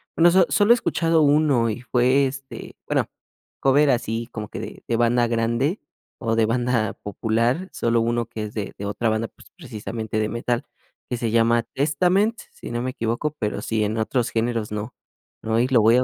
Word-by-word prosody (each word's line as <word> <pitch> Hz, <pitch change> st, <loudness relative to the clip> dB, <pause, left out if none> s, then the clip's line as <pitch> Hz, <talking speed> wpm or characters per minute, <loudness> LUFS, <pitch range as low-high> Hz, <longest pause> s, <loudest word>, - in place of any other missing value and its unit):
bueno, 170 Hz, +1 st, +6 dB
so 185 Hz, 0 st, +5 dB
solo 205 Hz, +2 st, +3 dB
he -, -, +9 dB
escuchado 165 Hz, -8 st, +1 dB
uno 145 Hz, -5 st, +3 dB
y 110 Hz, +2 st, -4 dB
fue, 130 Hz, +2 st, +3 dB
este 135 Hz, 0 st, -7 dB
bueno, -, -, +2 dB, 0.6 s
cover 140 Hz, +2 st, +4 dB
así 115 Hz, -2 st, -1 dB
como 110 Hz, -2 st, -5 dB
que -, -, -7 dB
de -, -, -9 dB
de 120 Hz, -, 0 dB
banda 120 Hz, +1 st, +3 dB
grande, 115 Hz, -, 0 dB, 0.4 s
o 115 Hz, -2 st, -1 dB
de 115 Hz, -, +4 dB
banda 115 Hz, -2 st, 0 dB
popular, 115 Hz, -, -1 dB
solo 115 Hz, 0 st, +1 dB
uno 120 Hz, 0 st, 0 dB
que 110 Hz, -, -6 dB
es 105 Hz, 0 st, -6 dB
de 105 Hz, -3 st, -4 dB
de 100 Hz, -, -5 dB
otra 110 Hz, +3 st, -1 dB
banda, 110 Hz, +1 st, 0 dB
pues, -, -, -20 dB
precisamente 110 Hz, -, -5 dB
de 110 Hz, 0 st, 0 dB
metal, 120 Hz, +2 st, -1 dB, 0.5 s
que 125 Hz, -, -2 dB
se 115 Hz, -2 st, -2 dB
llama 115 Hz, +1 st, +3 dB
Testament, 180 Hz, -, +1 dB
si -, -, -9 dB
no 120 Hz, 0 st, -2 dB
me 130 Hz, +1 st, -2 dB
equivoco, 120 Hz, +6 st, -2 dB
pero 105 Hz, -2 st, -2 dB
sí, 110 Hz, -1 st, -1 dB
en 105 Hz, +2 st, -1 dB
otros 115 Hz, +2 st, 0 dB
géneros, 115 Hz, -1 st, -1 dB
no. 105 Hz, +3 st, -4 dB, 0.5 s
No, 110 Hz, 0 st, 0 dB
y 120 Hz, -, +3 dB
lo 130 Hz, -3 st, +4 dB
voy 115 Hz, +3 st, +5 dB
a 125 Hz, -, +3 dB
120 Hz, 200 wpm, -23 LUFS, 115-135 Hz, 0.6 s, he